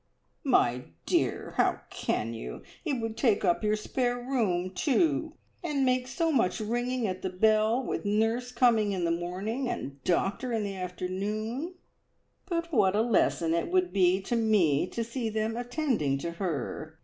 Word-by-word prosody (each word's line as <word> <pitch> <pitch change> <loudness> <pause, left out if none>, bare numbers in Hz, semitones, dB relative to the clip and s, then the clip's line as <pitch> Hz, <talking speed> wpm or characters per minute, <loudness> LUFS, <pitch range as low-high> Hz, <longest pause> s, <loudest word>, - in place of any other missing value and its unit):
"My 125 - +2 0.2
dear - - 0
how - - +2
can 115 +2 -2
you! 115 - -7 0.2
It 310 -5 -1
would 225 -1 -3
take 225 -5 +2
up 175 - +2
your 210 0 +2
spare 245 +3 -1
room, 220 -8 0
too, 310 - +1 0.3
and 290 -5 +1
make 255 0 +1
so 330 +5 0
much 230 -7 +2
ringing 240 +3 -1
at 185 -2 -3
the 190 - -2
bell 215 +5 +3
with - - -3
nurse 225 +4 +1
coming 230 -4 +3
in 180 -3 -1
the 170 - +1
morning 190 +9 -2
and 140 - -3
the - - -21
doctor 195 +7 0
in 220 -2 0
the 200 -1 -4
afternoon." 205 - -3 0.7
"But 335 -2 -2
what 200 -5 +4
a 215 - +3
lesson 170 -7 +2
it 170 - 0
would 365 0 +1
be 185 0 +3
to 240 - -1
me 195 -10 +3
to 230 - -3
see 235 0 -3
them 220 +1 -1
attending 245 - 0
to 170 +5 -4
her! 160 -2 -4
220 Hz, 170 wpm, -29 LUFS, 185-250 Hz, 0.7 s, what